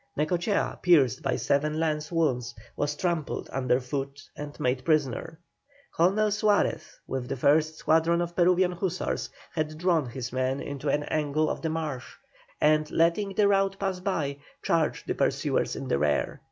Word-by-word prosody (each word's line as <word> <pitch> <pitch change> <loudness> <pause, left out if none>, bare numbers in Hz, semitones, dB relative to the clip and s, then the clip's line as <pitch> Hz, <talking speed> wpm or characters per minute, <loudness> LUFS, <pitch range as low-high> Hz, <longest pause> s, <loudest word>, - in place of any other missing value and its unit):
Necochea, 175 +7 0
pierced 150 -10 +4
by 135 - 0
seven 150 +2 0
lance 155 -1 -1
wounds, 125 -8 0 0.2
was 145 0 -1
trampled 170 -3 -2
under 130 -1 +1
foot 135 +2 -4 0.2
and 145 0 -8
made 130 +1 0
prisoner. 155 +1 0 0.6
Colonel 200 +5 +3
Suarez, 210 0 +1
with 130 -2 -4
the - - -2
first 155 +4 +3
squadron 165 +2 +2
of 175 0 -3
Peruvian 180 +1 +3
hussars, 180 0 -2 0.2
had 155 -1 -2
drawn 165 -4 +1
his 125 0 -6
men 130 +1 0
into 140 +1 -4
an 145 +1 +1
angle 155 0 0
of - - -5
the 160 - -1
marsh, 155 -5 -4 0.4
and, 155 0 +3
letting 180 +4 +1
the 210 - +4
rout 195 -1 +2
pass 195 -2 -1
by, 150 -7 -2 0.3
charged 165 -2 0
the - - -1
pursuers - - 0
in - - -5
the 70 - +1
rear. 75 -1 0
155 Hz, 160 wpm, -27 LUFS, 140-175 Hz, 0.6 s, pierced